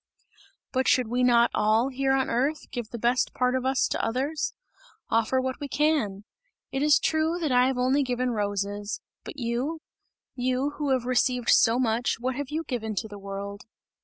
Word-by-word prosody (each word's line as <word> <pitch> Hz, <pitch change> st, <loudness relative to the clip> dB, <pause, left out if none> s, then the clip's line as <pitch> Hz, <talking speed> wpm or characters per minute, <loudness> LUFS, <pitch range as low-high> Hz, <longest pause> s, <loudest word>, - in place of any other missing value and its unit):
"But 260 Hz, -1 st, 0 dB
should 250 Hz, -3 st, +3 dB
we 245 Hz, +2 st, 0 dB
not 240 Hz, -1 st, +4 dB
all, 220 Hz, +4 st, +2 dB
here 270 Hz, 0 st, 0 dB
on 270 Hz, 0 st, +2 dB
earth, 275 Hz, +6 st, -1 dB
give 240 Hz, -4 st, -5 dB
the 235 Hz, -, -6 dB
best 240 Hz, +3 st, +1 dB
part 250 Hz, 0 st, +1 dB
of 260 Hz, 0 st, -1 dB
us 265 Hz, 0 st, +2 dB
to -, -, -2 dB
others? 270 Hz, +7 st, -1 dB, 0.6 s
Offer 230 Hz, +3 st, +2 dB
what 260 Hz, 0 st, -3 dB
we 285 Hz, -, -4 dB
can! 280 Hz, -10 st, 0 dB, 0.5 s
It 270 Hz, -, -2 dB
is 300 Hz, 0 st, +5 dB
true, 315 Hz, +2 st, +1 dB
that 310 Hz, -5 st, -1 dB
I 250 Hz, 0 st, +5 dB
have 265 Hz, -1 st, -1 dB
only 260 Hz, +3 st, +2 dB
given 250 Hz, -1 st, -1 dB
roses 205 Hz, -1 st, -2 dB, 0.2 s
but -, -, -9 dB
you? 250 Hz, +6 st, -2 dB, 0.5 s
You 255 Hz, +3 st, 0 dB
who 295 Hz, -2 st, -1 dB
have 260 Hz, -2 st, +1 dB
received 250 Hz, -1 st, +1 dB
so 230 Hz, +1 st, +5 dB
much, 235 Hz, -1 st, 0 dB
what 255 Hz, +2 st, -1 dB
have 285 Hz, 0 st, -4 dB
you 315 Hz, +2 st, -2 dB
given 220 Hz, -7 st, -4 dB
to 220 Hz, -, -2 dB
the 205 Hz, -1 st, -10 dB
world? 200 Hz, +1 st, -7 dB
250 Hz, 190 wpm, -26 LUFS, 230-270 Hz, 0.6 s, is